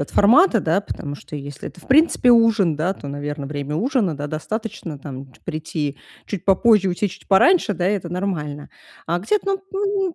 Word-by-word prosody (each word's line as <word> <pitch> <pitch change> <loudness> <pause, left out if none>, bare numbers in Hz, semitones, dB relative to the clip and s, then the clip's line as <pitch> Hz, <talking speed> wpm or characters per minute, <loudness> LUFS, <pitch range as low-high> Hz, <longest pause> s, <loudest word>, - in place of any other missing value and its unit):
от 145 - -4
формата, 235 - +5
да, 170 +4 +1
потому 145 -7 -6
что - - -11
если 145 0 -7
это, - - -15
в - - -19
принципе 275 -3 +4
ужин, 225 -8 +4
да, 170 +6 0
то, 145 - -9
наверно, 145 0 -5
время 145 +1 -4
ужина, 210 - 0
да, 145 - -4
достаточно, 175 -1 -5
там, 135 -2 -9
ч - - -23
прийти 155 -3 -4 0.3
чуть 195 -3 -5
попозже, 200 +1 +4
уйти 185 +3 -1
чуть 185 - -14
пораньше, 210 - +4
да, 175 +3 0
и - - +2
это 180 -4 -4
нормально. 165 -6 -4 0.4
А 170 +2 0
где-то, 390 - 0
ну, 390 -2 -1
180 Hz, 190 wpm, -21 LUFS, 150-225 Hz, 0.4 s, формата